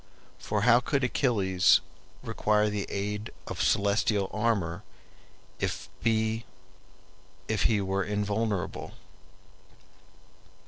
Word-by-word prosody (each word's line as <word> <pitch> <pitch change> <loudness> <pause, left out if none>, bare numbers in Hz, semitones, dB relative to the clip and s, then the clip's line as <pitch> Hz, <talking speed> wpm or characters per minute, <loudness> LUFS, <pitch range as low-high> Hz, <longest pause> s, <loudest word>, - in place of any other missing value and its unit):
For - - -1
how 120 - +6
could 135 +2 -1
Achilles 100 -8 +3 0.4
require 105 0 +1
the 105 -1 -3
aid 105 +2 -3 0.2
of - - -4
celestial 100 0 +2
armor 105 -5 0 0.8
if - - -3
be 110 0 +1 1.4
were 95 0 0
invulnerable? 105 -1 -2
105 Hz, 80 wpm, -28 LUFS, 100-110 Hz, 1.4 s, how